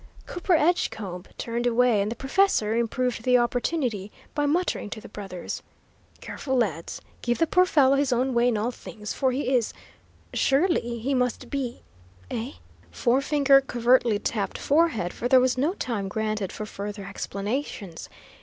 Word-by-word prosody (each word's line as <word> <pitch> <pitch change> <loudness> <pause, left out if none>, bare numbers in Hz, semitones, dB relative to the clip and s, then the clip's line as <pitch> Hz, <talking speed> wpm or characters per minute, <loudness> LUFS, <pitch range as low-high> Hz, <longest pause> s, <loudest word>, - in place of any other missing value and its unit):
Cooper 355 +1 -1
Edgecombe 220 - 0
turned 235 +1 -2
away, 240 -3 +3
and 205 +2 -1
the - - -3
professor 270 - +2
improved 235 +1 0
the 250 +1 +4
opportunity 240 - -1 0.2
by 290 -1 +1
muttering 335 - 0
to 220 - -6
the - - -11
brothers: 190 -4 -6 0.6
"Careful, 265 -2 -3
lads. 175 -9 -1 0.2
Give 240 0 0
the 330 - +3
poor 365 +3 +3
fellow 275 -5 +4
his 280 -1 +1
own 250 +2 +1
way 240 +1 +3
in 235 -3 +2
all 225 +4 -1
things, 210 -3 -7
for 260 -1 +1
he 265 +1 -1
is 235 -3 +1 0.6
he - - -5
surely 270 -5 +1
must 250 -1 -1
be 260 -4 -3 0.5
eh?" 235 +5 -3 0.4
Forefinger 275 +2 +3
covertly 245 -3 +3
tapped 205 -2 -2
forehead, 285 - +1
for 245 - -2
there 260 0 +6
was 255 0 +2
no 295 +9 0
time 215 - -3
granted 215 -1 -2
for 215 - -5
further 205 -1 -6
explanations. 200 - -4
245 Hz, 155 wpm, -26 LUFS, 215-275 Hz, 0.6 s, there